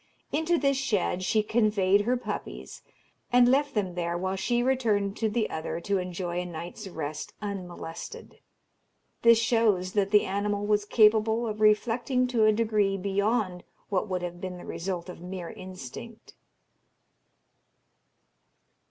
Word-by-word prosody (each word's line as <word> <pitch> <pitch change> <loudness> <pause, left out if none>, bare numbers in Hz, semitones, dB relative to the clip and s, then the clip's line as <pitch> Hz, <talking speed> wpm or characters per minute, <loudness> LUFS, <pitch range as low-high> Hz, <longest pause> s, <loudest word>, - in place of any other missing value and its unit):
Into 320 +3 +1
this 275 -3 +2
shed 205 -8 0
she 215 +3 +2
conveyed 210 -3 +3
her 245 +4 +1
puppies, 245 - -6 0.5
and 245 0 +6
left 280 +2 +2
them 190 -4 0
there 175 -1 -2
while 185 +2 -2
she 240 +5 0
returned 220 -6 +1
to 220 - 0
the 220 0 0
other 160 +1 -3
to 200 +2 0
enjoy 180 -1 -3
a - - -5
night's 175 +5 -7
rest 155 -4 -5
unmolested. 180 -5 -7 0.8
This 235 -1 +7
shows 220 -5 +2
that 200 -2 +1
the 210 0 +4
animal 205 +1 -1
was 210 0 +2
capable 220 +1 +4
of 215 -1 -4
reflecting 240 +4 +3
to 230 -3 +3
a 215 - +6
degree 210 -3 +1
beyond 200 -1 0 0.3
what 195 +1 0
would 180 -1 -2
have 175 0 -6
been 185 -1 -5
the 175 - -10
result 180 -1 -4
of 180 -2 -9
mere 180 -1 -6
instinct. 185 - -10
205 Hz, 145 wpm, -28 LUFS, 185-225 Hz, 0.8 s, This